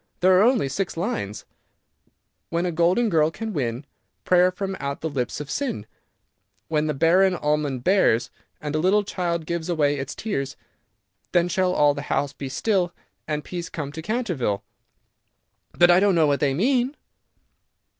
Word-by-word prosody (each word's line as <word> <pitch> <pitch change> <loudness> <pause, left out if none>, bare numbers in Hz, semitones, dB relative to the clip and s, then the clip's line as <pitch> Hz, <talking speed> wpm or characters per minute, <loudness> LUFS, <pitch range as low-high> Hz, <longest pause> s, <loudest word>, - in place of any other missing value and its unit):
There 185 +1 +5
are - - +5
only 235 - +3
six 180 +5 -3
lines: 165 - -3 1.0
"'When 170 +1 -1
a 180 - 0
golden 175 +8 +2
girl 160 -6 +3
can 220 +6 -6
win 125 -2 -2 0.4
Prayer 180 0 +5
from 195 +1 -4
out 140 -1 -4
the 160 - -2
lips 125 -2 -2
of 150 0 -6
sin, 255 - -2 0.8
When 155 -1 +1
the 150 - -1
barren 180 +5 +4
almond 150 -5 -1
bears, 125 - +3 0.3
And 150 -1 -5
a 155 - +1
little 195 +5 +3
child 170 -4 -2
gives 170 0 -3
away 145 -4 +1
its 135 - -5
tears, 140 -11 -3 0.8
Then 175 -1 +3
shall 180 +1 +1
all 145 -3 +4
the 140 - -5
house 140 -1 0
be 135 - -6
still 185 +2 0 0.3
And 150 -1 -2
peace 175 -2 -6
come 145 -3 -5
to 160 +2 -7
Canterville.' 175 - -2 1.1
"But 175 0 +5
I 175 - +6
don't 200 -1 +3
know 160 -2 +4
what 145 -1 +1
they 135 -2 +1
mean." 255 - +1
170 Hz, 165 wpm, -24 LUFS, 145-185 Hz, 1.1 s, I